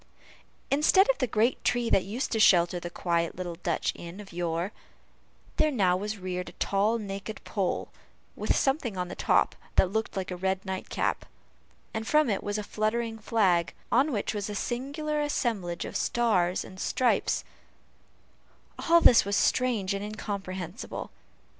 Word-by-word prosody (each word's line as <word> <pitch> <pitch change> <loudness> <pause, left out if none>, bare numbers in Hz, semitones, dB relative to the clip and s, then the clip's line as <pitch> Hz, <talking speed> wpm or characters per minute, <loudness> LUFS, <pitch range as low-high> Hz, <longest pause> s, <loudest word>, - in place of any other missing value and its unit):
Instead 305 +8 +5
of - - -7
the 255 - +1
great 225 +3 +1
tree 245 -1 +1
that 190 - +3
used 225 +7 -3
to 225 - 0
shelter 175 -3 +5
the 175 - -6
quiet 170 -1 -1
little 180 -1 -4
Dutch 170 - -1
inn 170 +3 -9
of 200 -3 -11
yore, 170 +2 -2 0.9
there 310 - +3
now 195 -10 +2
was 210 +3 -3
reared 180 -1 -4
a - - -14
tall 205 +6 +1
naked 200 0 -6
pole, 195 -4 -2 0.5
with - - 0
something 270 - 0
on 180 -1 -2
the - - -6
top - - +2 0.2
that 185 - +4
looked 220 -1 -2
like 190 -1 -3
a - - -2
red 190 +1 -1
nightcap, 190 -1 -2 0.7
and 220 0 -3
from 300 -5 +4
it 195 - -1
was 205 +1 -2
fluttering 220 +2 -2
a - - -20
flag, 185 -7 +2 0.2
on 275 +5 +4
which 210 -4 -1
was 205 -1 -3
a 205 - -4
singular 285 +7 -2
assemblage 220 -12 -1
of - - -7
stars 190 -7 +1
and 185 - -12
stripes 250 +4 +1 1.5
all 340 0 +7
this 240 - +7
was 200 +1 -1
strange 225 -7 +2
and 200 0 -3
incomprehensible. 200 - -5
205 Hz, 160 wpm, -28 LUFS, 185-235 Hz, 1.5 s, all